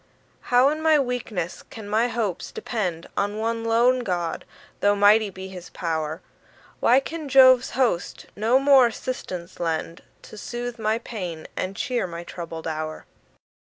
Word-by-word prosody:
How 250 +2 +5
in 310 +1 -2
my 315 -1 +5
weakness 240 - -3
can 220 -3 -9
my 220 +3 +2
hopes 225 -7 -3
depend 180 -8 -3
On 205 +1 -1
one 230 +1 -2
lone 235 +3 +3
God, 175 -7 -3 0.3
though 205 0 +3
mighty 205 +1 +5
be 190 0 -9
his 180 -2 -10
pow'r? 160 -2 -3 0.6
Why 250 +3 +5
can 310 +1 -6
Jove's 260 -1 +7
host 235 -10 0
no 225 +5 +3
more 275 -2 +6
assistance 185 -7 -6
lend, 165 0 -2 0.2
To 215 - -11
soothe 240 +1 -5
my 220 0 +1
pains, 185 -9 -6
and 185 +1 -3
cheer 245 -3 -1
my 170 0 -7
troubled 165 -2 -7
hour? 155 0 -4
215 Hz, 150 wpm, -24 LUFS, 175-245 Hz, 0.6 s, Jove's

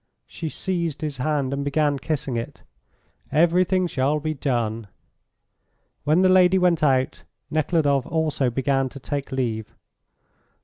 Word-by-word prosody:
She 160 - -6
seized 170 -4 -3
his 150 -3 -3
hand, 140 0 -1
and 140 0 -2
began 145 0 +1
kissing 140 -3 -3
it. 115 0 -5 0.7
"Everything 180 +4 +3
shall 145 -2 0
be 155 +1 -2
done." 115 -6 -2 1.2
When 155 +5 +3
the - - +6
lady 185 0 +5
went 180 -3 +2
out 130 -3 +1 0.3
Nekhludoff 150 -3 +1
also 155 -5 0
began 135 +1 0
to 140 - -10
take 140 +1 -4
leave. 115 -5 -3
145 Hz, 130 wpm, -23 LUFS, 135-160 Hz, 1.2 s, the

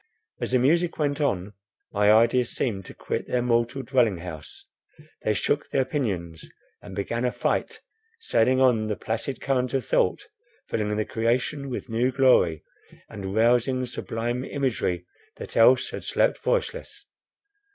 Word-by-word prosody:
As 120 - -1
the 130 - +4
music 165 +7 +2
went 145 0 0
on, 100 -8 -1 0.4
my 105 0 +4
ideas 115 +2 +4
seemed 100 -7 -2
to - - -10
quit - - -4
their 125 -1 0
mortal 120 +2 0
dwelling 120 -6 +2
house; 85 -3 -9 0.6
they - - 0
shook - - 0
their 130 - +1
pinions 95 - -3 0.3
and 100 -2 -10
began 115 +4 -2
a 125 - +1
flight, - - -2 0.4
sailing 130 - +2
on 120 -5 +3
the 105 - -1
placid 115 +6 -4
current 130 -2 0
of 135 - -1
thought, - - +1 0.4
filling 105 -1 -1
the 110 - 0
creation 125 +5 -1
with 125 - -5
new 120 +2 +1
glory, 125 - +3 0.5
and 95 -1 -6
rousing 125 +3 +3
sublime 120 0 -3
imagery 115 -12 -2 0.3
that - - -9
else 125 +3 +5
had - - -6
slept - - +1
voiceless. - - -2
120 Hz, 150 wpm, -25 LUFS, 105-130 Hz, 0.6 s, else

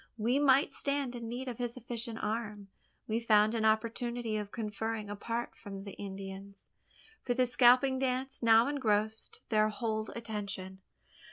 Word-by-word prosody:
We 235 +5 +2
might 275 0 +4
stand 280 -3 -1
in 230 -1 -5
need 250 +3 -4
of 245 -2 -5
his 240 0 -3
efficient 235 -1 -4
arm. 210 -2 -3 0.4
We 225 +1 0
found 215 -2 +4
an 225 -1 0
opportunity 230 +1 0
of 210 -1 -3
conferring 215 -1 -3
apart 230 +3 -3
from 195 -1 -8
the 200 -2 -8
Indians 195 0 -8 0.5
for 245 - -1
the 255 0 +3
scalp 245 0 +6
dance 265 -1 -1
now 230 0 +6
engrossed 220 -6 -1
their 215 -1 +3
whole 220 0 -2
attention. 200 -4 -4
225 Hz, 150 wpm, -32 LUFS, 210-245 Hz, 0.5 s, scalp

